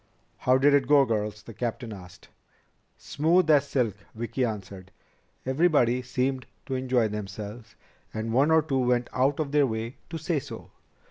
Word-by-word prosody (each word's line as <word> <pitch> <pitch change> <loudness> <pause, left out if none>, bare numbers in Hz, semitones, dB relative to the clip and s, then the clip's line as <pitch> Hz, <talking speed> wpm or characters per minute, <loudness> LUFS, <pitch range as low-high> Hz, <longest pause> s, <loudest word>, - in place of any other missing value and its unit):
"How 130 +1 +3
did 140 +2 +4
it 140 -3 +3
go, 145 -1 +6
girls?" 105 -3 -2
the 115 - -10
captain 120 +1 -4
asked. 90 -2 -13 0.7
"Smooth 165 +4 +2
as 145 -1 +4
silk," 120 -8 0 0.2
Vicki 120 +3 -2
answered. 100 -4 -5 0.6
"Everybody 130 -3 +2
seemed 130 +1 -2 0.2
to 135 - -4
enjoy 130 -3 +1
themselves, 105 +2 -7 0.4
and 110 +1 -4
one 135 +5 +4
or 160 -1 +5
two 140 -4 -1
went 125 -1 +1
out 135 +3 +1
of 150 -3 -2
their 145 -2 +4
way 115 +1 -4
to 165 - -4
say 160 0 -1
so." 130 -5 -10
125 Hz, 160 wpm, -27 LUFS, 110-140 Hz, 0.7 s, go